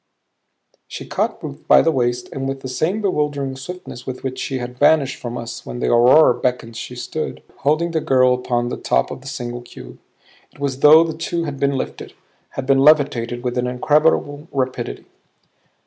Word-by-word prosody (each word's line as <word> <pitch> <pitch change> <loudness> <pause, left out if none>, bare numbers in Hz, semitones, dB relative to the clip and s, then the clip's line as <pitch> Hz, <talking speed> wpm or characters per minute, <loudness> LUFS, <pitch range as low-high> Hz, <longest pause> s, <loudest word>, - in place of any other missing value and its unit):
She - - -8
caught - - -2
Ruth - - -8
by - - +7
the 165 - +3
waist 120 -3 -1
and 135 0 -4
with 135 0 -5
the 130 - -6
same 175 +11 -1
bewildering 145 -7 -1
swiftness 135 -2 -9
with 130 -1 -6
which 130 -1 -4
she 135 - -3
had 125 0 -7
vanished 145 -4 +3
from 120 0 -6
us 120 0 -7
when - - -7
the 120 - 0
aurora 125 +3 +6
beckoned 125 -2 -2
she 125 +2 -7
stood, 155 +5 -5
holding 155 +4 +1
the 160 -1 0
girl, 130 -2 +4
upon 120 -1 -1
the - - -4
top 60 - 0
of - - -7
the 135 - -12
single 120 -2 -5
cube. 90 - -12 0.5
It - - -20
was 140 -1 -1
as - - -17
though 155 +3 +8
the 165 -1 -3
two 170 +1 -2
had 145 -4 -5
been 140 -1 +1
lifted, - - -6 0.4
had 135 - -3
been 135 0 +3
levitated 135 -5 +3
with 125 0 -1
an 125 - -1
incredible 145 +3 +1
rapidity. 130 -3 -3
135 Hz, 195 wpm, -20 LUFS, 125-150 Hz, 0.5 s, though